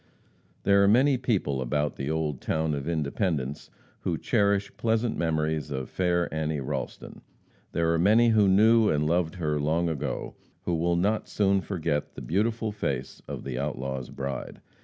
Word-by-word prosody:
There 100 0 +5
are - - +5
many 130 +7 +5
people 95 - 0
about 75 +4 -1
the 70 +1 -4
old 75 -4 -1
town 80 -1 0
of 70 0 -4
Independence 75 -3 -2 0.3
who - - -2
cherish 100 -1 +1
pleasant 115 0 0
memories 80 -3 -1
of 65 -1 -4
fair 90 -1 +1
Annie 80 -1 -1
Ralston. 65 - -5 0.5
There 85 0 +2
are 85 - +1
many 110 +6 +5
who 110 -3 +4
knew 110 +3 +5
and 75 0 +1
loved 80 0 +1
her 75 -4 -1
long 80 +4 +1
ago, 75 -3 -3 0.3
who 90 - -1
will 85 +1 +1
not 105 +5 0
soon 100 -1 +2
forget 80 -6 -2
the - - -7
beautiful 110 +5 0
face 70 -11 -3
of - - -6
the 65 -2 -4
outlaw's 65 -1 -3
bride. 70 0 -5
85 Hz, 160 wpm, -27 LUFS, 75-100 Hz, 0.5 s, There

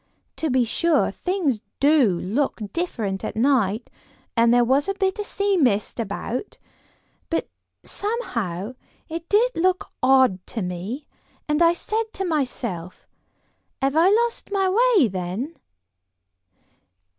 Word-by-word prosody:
To 320 - -1
be 255 -2 +3
sure, 335 +8 +2
things 340 - -1 0.2
do 275 - +4
look 235 +12 -1
different 220 - -2
at - - -4
night, 225 -3 +1 0.4
and 230 0 +4
there 245 0 +5
was 270 +8 +2
a 395 - 0
bit 385 0 0
of 415 - -2
sea 400 -1 +1
mist 240 - +1
about, 230 - -4 0.7
but 330 - -1 0.4
somehow 235 - -3 0.4
it 330 +1 -6
did 460 +5 +4
look 370 +2 0
odd 255 -8 +4
to 225 - -4
me, 185 - -5 0.4
and 300 +2 +1
I 335 0 +6
said 435 +6 -2
to 385 - -3
myself, 240 - -3 0.7
'have 270 +2 0
I 335 +4 +5
lost 465 +3 +1
my 390 -1 +1 0.3
way, 285 -10 +5
then? 190 - -4
270 Hz, 130 wpm, -23 LUFS, 220-360 Hz, 0.7 s, I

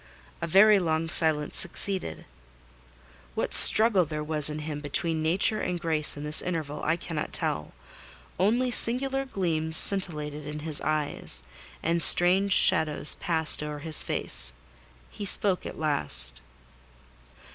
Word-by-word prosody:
A 170 - -4
very 200 +4 +4
long 165 -2 -3
silence 155 -3 -1
succeeded. 195 -2 -3 1.1
What - - -4
struggle 215 -4 +7
there 150 -1 -7
was 150 -1 -1
in 150 - -7
him 150 -2 -7
between 160 +2 -3
Nature 190 +7 +1
and 180 -1 -5
Grace 155 -3 -1
in 145 - -9
this 150 +1 -5
interval, 155 -5 -6
I 160 - -1
cannot 165 -3 -7
tell: 75 0 -4 0.7
only 240 +7 -1
singular 270 +3 -1
gleams 160 -9 -2
scintillated 150 -6 -2
in 150 0 -8
his 155 -1 -4
eyes, 145 - -4 0.4
and 170 +1 -2
strange 185 +4 +7
shadows 155 -4 +3
passed 160 -3 -1
over 150 0 -7
his 155 +1 +1
face. 60 0 -2 0.6
He - - -10
spoke 195 -1 0
at - - -11
last. 70 - -2
160 Hz, 135 wpm, -25 LUFS, 150-185 Hz, 1.1 s, struggle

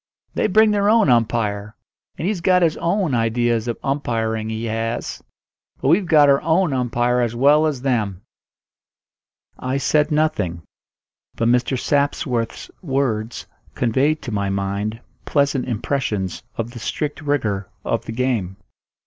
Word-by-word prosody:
"They - - +1
bring 215 +2 +5
their 205 0 +2
own 220 - +5
umpire, 110 -3 0 0.4
and 170 - -2
he's 200 -4 -1
got 180 0 +4
his 165 -2 +2
own 175 -3 0
ideas 115 0 +1
of 120 - -2
umpiring, 115 -5 -1
he 110 +1 -3
has. 115 +1 -3 0.6
But 135 - 0
we've 180 +4 +3
got 150 -3 +6
our 140 0 +4
own 165 0 +2
umpire 125 -1 +1
as 120 -1 -1
well 145 +5 +4
as 135 -5 -3
them." 105 -8 -1 1.4
I 130 +1 -1
said 150 +2 +2
nothing; 150 - 0 0.7
but 115 - +1
Mr. 125 +2 +2
Sapsworth's 135 -5 -1
words 130 - -2 0.3
conveyed 135 +6 +1
to 120 - -5
my 100 -2 -1
mind 100 +3 -2 0.3
pleasant 140 -3 +1
impressions 110 -5 -2 0.2
of 115 +1 -3
the 120 - -9
strict 150 +6 -3
rigour 110 -10 -1 0.2
of - - -1
the - - -5
game. 115 -6 -1
125 Hz, 140 wpm, -21 LUFS, 110-150 Hz, 1.4 s, got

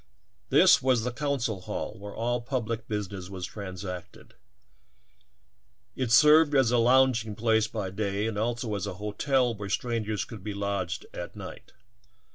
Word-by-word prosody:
This - - +6
was 125 -3 +2
the 125 - -1
coun 140 +2 -1
cil 110 -5 -2
hall - - -4
where 100 0 -8
all 120 +1 -1
public 115 -3 -3
business 100 -3 -4
was 95 -2 -5
transacted; 90 -3 -8 1.6
it 130 -3 -2
served 150 +5 +6
as 130 -4 +4
a 120 - +3
lounging 120 -3 +3
place 110 0 +2
by 105 -4 -4
day 100 +1 -2
and 110 -1 -2
also 115 +1 -2
as 100 -2 -2
a - - -5
hotel 120 +5 0
where 100 -2 -7
strangers 110 -3 -1
could 110 -5 -10
be 105 -1 -4
lodged 100 -3 -2
at - - -7
night. - - -10
110 Hz, 155 wpm, -28 LUFS, 100-120 Hz, 1.6 s, This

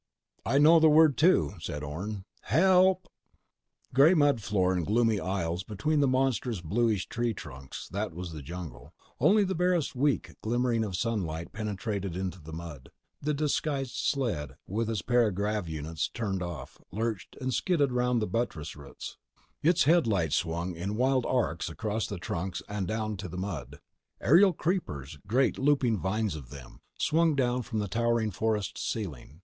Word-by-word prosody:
"I 135 - +3
know 160 +3 +7
the 160 0 +6
word, 155 -2 +6
too," 175 - +4
said 75 -2 -5
Orne. 95 +7 -5 0.2
"HELP!" 185 +1 +4 0.9
Gray 145 +7 +6
mud 145 -6 +3
floor 95 -3 +1
and 90 -2 0
gloomy 110 +2 +2
aisles 90 -2 -2
between 110 +10 -1
monstrous 130 -4 +1
bluish 105 +4 0
tree 120 -1 -1
trunks—that 90 +11 -6
was 90 +1 -6
the 80 -2 -7
jungle. 85 +3 -8 0.2
Only 210 +1 +5
the 190 -1 -1
barest 180 -5 +1
weak 140 +2 0
glimmering 120 0 +1
of 100 -4 -3
sunlight 90 -7 -2
penetrated 100 -3 -3
to 95 0 -4
the 80 +1 -10
mud. 80 -5 -8 0.3
The 150 +1 0
disguised 140 -2 -1
sled—its 105 - -2
para 120 -1 +3
grav 100 -1 -2
units 80 0 -3
turned 100 -5 -3
off—lurched 95 +4 -5
and 130 -1 -2
skidded 145 -3 +2
around 125 -1 +1
buttress 85 - -2
roots. 70 -2 -9 0.4
Its 170 +2 +4
headlights 110 - +3
swung 85 +1 -2
in 95 +5 -3
wild 130 +1 +2
arcs 110 -11 0
across 105 +6 -2
the 100 - -5
trunks 90 +1 -4
and 100 -3 -3
down 110 -1 -2
to 95 0 -6
the 90 - -7
mud. 95 -5 -5 0.4
Aerial 180 - +6
creepers—great 115 - -1
looping 135 -6 +2
vines 105 0 -1
of 70 -6 -9
them—swung 150 - -1
down 125 -2 +1
from 115 -1 -5
the 105 -1 -1
towering 115 +1 +1
forest 105 0 -1
ceiling. 80 - -5
110 Hz, 145 wpm, -29 LUFS, 90-130 Hz, 0.9 s, know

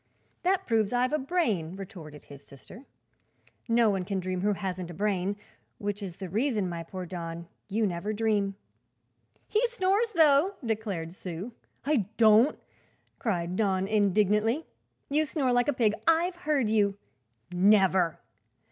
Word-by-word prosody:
"That 375 +1 +1
proves 220 -3 +1
I've 250 +2 +1
a 305 - +2
brain," 235 - -1
retorted 175 -7 -10
his 140 -1 -13
sister. 185 - -14 0.8
"No 230 -2 +4
one 190 -2 -1
can 195 +1 -2
dream 185 0 -3
who 205 +2 +2
hasn't 185 -3 -4
a 175 - -8
brain; 200 0 0 0.4
which 205 0 -4
is 185 -3 -6
the 190 - -6
reason, 215 - 0
my 170 -1 -4
poor 180 +2 -7
Don, 170 -1 -6 0.2
you 215 +2 +1
never 185 +2 -2
dream." 210 -2 0 0.9
"He 430 - +1
snores, 420 -1 +1
though," 315 +4 +4
declared 205 -7 -3
Sue. 185 +4 -6 0.3
"I 275 -10 +1
don't!" 225 +4 +5 0.6
cried 180 -5 -1
Don 190 -2 +1
indignantly. 210 - +2 0.4
"You 300 +2 +2
snore 280 -3 0
like 245 0 +2
a - - +3
pig; 230 -6 +2
I've 335 +2 +3
heard 300 -8 0
you." 205 -2 +2 0.6
"Never!" 190 -2 +3
210 Hz, 145 wpm, -28 LUFS, 185-250 Hz, 0.9 s, don't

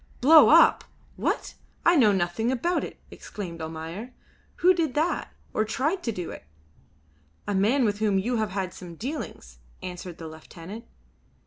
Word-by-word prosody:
"Blow 310 +5 +8
up! - - +6 0.3
What? - - -2 0.3
I 345 - +6
know 235 -9 +6
nothing 190 +5 0
about 340 +8 0
it," - - -8
exclaimed 170 -5 -8
Almayer. 165 +9 -6 0.4
"Who 365 +2 +5
did 320 -6 -1
that, 315 +4 0 0.2
or 215 - +2
tried 295 - -1
to 235 - -2
do 180 -5 -5
it?" - - -10 1.0
"A 205 - -1
man 225 +7 +3
with 205 -1 0
whom 210 -3 +2
you 235 +5 0
had 195 -3 -2
some 175 -2 -10
dealings," 165 - -6 0.2
answered 180 -1 -7
the 165 - -8
lieutenant. 165 +7 -10
210 Hz, 150 wpm, -26 LUFS, 175-255 Hz, 1.0 s, Blow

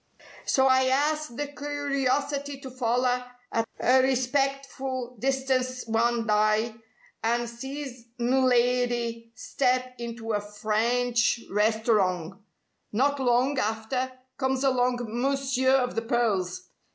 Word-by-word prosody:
So 265 - +3
I 260 0 +4
'as 300 +3 +1
the 245 +5 -4
curiosity 285 -1 -2
to 265 - -8
foller 250 0 +1 0.3
at 225 0 -1
a 260 +1 +5
respectful 265 -1 -1
distance 260 -1 0
one 230 +1 +1
dye, 215 +1 +2 0.5
an' 235 +1 +1
sees 255 +1 -7
m' 260 +2 +2
lidy 240 -2 +1
step 255 0 0
into 230 -1 -4
a 205 - 0
French 230 +3 +1
restorong. 205 -4 +1 0.5
Not 280 +6 +1
long 255 +2 +2
after, 220 +4 -1 0.3
comes 265 0 0
along 250 -2 +2
Mounseer 260 +2 0
of 250 -2 +1
the 225 - -1
pearls. 230 - 0
250 Hz, 110 wpm, -27 LUFS, 230-265 Hz, 0.5 s, a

